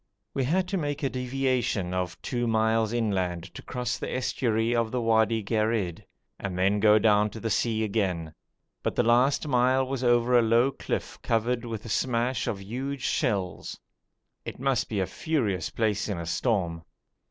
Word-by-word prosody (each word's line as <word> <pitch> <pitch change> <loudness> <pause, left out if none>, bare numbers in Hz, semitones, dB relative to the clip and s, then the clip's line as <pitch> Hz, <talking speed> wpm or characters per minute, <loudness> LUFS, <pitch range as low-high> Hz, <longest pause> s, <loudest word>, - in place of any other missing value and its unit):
We 135 - 0
had 180 +7 +1
to 195 - 0
make 145 -2 -3
a 135 - 0
deviation 125 -7 -1
of 90 -1 -3
two 120 -1 -1
miles 110 0 +2
inland 95 -7 -1
to - - -8
cross 125 -1 -3
the - - -4
estuary 120 -3 0
of 115 -1 +1
the 125 - -2
Wadi 110 -1 +2
Gherid, 110 -4 -1 0.4
and 95 -3 -4
then 100 +3 +2
go 105 0 +6
down 105 -1 +4
to 110 - -9
the 115 0 -2
sea 110 +1 +1
again, 95 -7 -1 0.5
but - - -2
the - - +3
last 125 +6 +3
mile 130 0 +3
was 130 -1 -3
over 120 0 +3
a 120 - +7
low 115 +4 +3
cliff - - -4
covered 120 +2 0
with 115 -2 -5
a - - -7
smash 120 +1 0
of 100 - -2
huge 130 +6 -4
shells. 100 - -1 0.6
It - - -7
must 130 -1 0
be 105 - -1
a 95 - +1
furious 110 - -1
place 110 -2 -1
in 100 - -2
a 85 - -5
storm. 85 -4 -1
115 Hz, 175 wpm, -27 LUFS, 105-125 Hz, 0.6 s, a